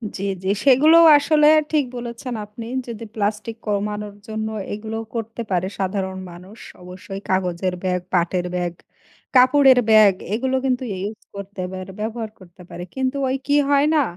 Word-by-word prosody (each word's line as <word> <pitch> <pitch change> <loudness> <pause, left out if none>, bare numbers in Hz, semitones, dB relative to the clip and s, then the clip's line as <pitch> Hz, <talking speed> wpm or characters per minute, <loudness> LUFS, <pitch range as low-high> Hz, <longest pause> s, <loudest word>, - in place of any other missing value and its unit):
জ্বী, 195 - -4 0.2
জ্বী, 190 - +1
সেগুলো 290 +5 +6 0.2
আসলে 300 +1 +3 0.2
ঠিক 300 -3 +2
বলেছেন 240 +1 -6
আপনি। 220 +2 -9 0.2
যদি 230 -1 -7
প্লাস্টিক 210 +1 -2
কমানোর 210 0 -2
জন্য 220 0 -3 0.3
এগুলো 220 +1 -5 0.2
করতে 225 +1 -4
পারে 185 0 0
সাধারণ 190 -1 -2
মানুষ। 185 +5 -13 0.3
অবশ্যই 190 +2 -9
কাগজের 185 -1 0
ব্যাগ, 180 -1 0
পাটের 175 0 +1
ব্যাগ, 175 -1 -2 0.6
কাপড়ের 260 0 +6
ব্যাগ 215 -2 +7 0.2
এগুলো 260 +4 0
কিন্তু 260 0 0 0.2
ইউজ 210 +3 -5 0.2
করতে 200 -1 -6
পারে, 185 0 -7
ব্যবহার 225 0 -4
করতে 180 -1 -16
পারে। 175 - -7
কিন্তু 265 +1 -1
ওই 260 - 0
কি 290 0 +3
হয় 285 +1 +4
না? 300 - +4
210 Hz, 150 wpm, -21 LUFS, 190-250 Hz, 0.6 s, ব্যাগ